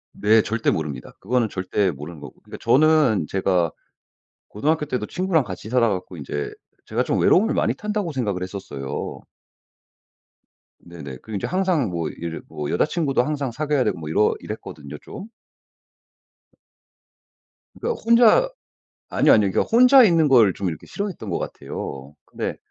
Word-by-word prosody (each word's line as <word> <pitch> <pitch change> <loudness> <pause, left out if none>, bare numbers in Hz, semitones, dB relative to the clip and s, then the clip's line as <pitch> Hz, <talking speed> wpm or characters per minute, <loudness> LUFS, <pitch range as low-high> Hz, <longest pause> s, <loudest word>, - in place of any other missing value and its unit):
네. 105 +2 +4
절대 115 +1 -1
모릅니다. 75 -3 -3
그거는 120 +2 0
절대 95 +1 0
모르는 75 +3 -9
거고 70 - -12
그러니까 - - -10
저는 150 - +4
제가 90 -4 +1 0.8
고등학교 150 +8 0
때도 125 -7 -3
친구랑 180 - 0
같이 100 +1 -8
살아 120 -2 +3
갖고 95 -2 -4
인제 75 0 -4 0.3
제가 - - -1
좀 - - 0
외로움을 210 +5 +4
많이 - - +1
탄다고 210 -5 -3
생각을 105 -9 -2
했었어요. 90 -8 -6 1.6
네네. 75 -7 -10
그리고 110 - -7
이제 - - -3
항상 185 - +1
뭐 85 -3 -3
이제 85 +1 -6
뭐 75 -1 -5
여자친구도 150 -6 +1
항상 140 -2 -2
사귀어야 145 +1 0
되고 - - -1
뭐 80 -2 -7
이러 105 +7 +3
이랬거든요, 75 -2 -8
좀. 200 - -9 2.5
그러니까 470 -1 -3
혼자 235 - +5 0.6
아니요, - - +4
아니요. 105 -3 +3
그러니까 - - +2
혼자 250 +3 +6
있는 165 -7 +4
걸 115 -8 +5
좀 95 0 -2
이렇게 80 - -8
싫어했던 195 - -5
것 85 - -1
같아요. 70 +1 -7
근데 - - -5
110 Hz, 345 characters per minute, -22 LUFS, -, 2.5 s, 혼자